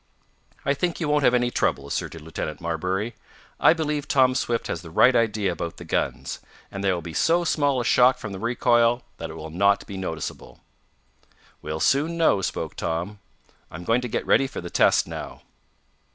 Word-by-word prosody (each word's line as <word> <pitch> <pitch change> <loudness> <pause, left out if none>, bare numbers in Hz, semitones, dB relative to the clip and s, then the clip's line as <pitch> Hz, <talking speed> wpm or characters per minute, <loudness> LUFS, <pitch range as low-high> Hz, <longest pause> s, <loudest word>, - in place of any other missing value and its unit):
"I 140 - +3
think 175 +4 -2
you 165 - -1
won't 150 -1 +2
have 125 - +5
any 120 0 +1
trouble," 70 - 0
asserted 80 +3 -4
Lieutenant 75 -1 -5
Marbury. 90 +7 -2 0.5
"I - - +6
believe 150 -3 -2
Tom 130 -2 +4
Swift 120 -2 -1
has 85 - -4
the 85 - -11
right 125 +10 +5
idea 105 -4 +1
about 85 0 -5
the - - -10
guns, - - -2 0.3
and 95 - -5
there 95 -2 +2
will 85 - -5
be 85 - -7
so 170 - +2
small 145 -5 +1
a 120 - -2
shock 125 +2 +5
from - - -7
the 95 - -6
recoil 120 +1 +2
that 80 - -6
it 80 - -8
will 80 0 -8
not 100 +4 +2
be 100 - -7
noticeable." 80 -5 -6 1.0
"We'll 75 +1 -4
soon 155 - +2
know," 160 -12 +3
spoke - - -3
Tom. 90 +6 -3 0.5
"I'm 85 +3 -8
going 115 +6 +2
to 125 - -3
get - - -2
ready 135 - +3
for 135 - -7
the 85 0 -7
test - - +4
now." - - -8
110 Hz, 195 wpm, -24 LUFS, 85-130 Hz, 1.0 s, I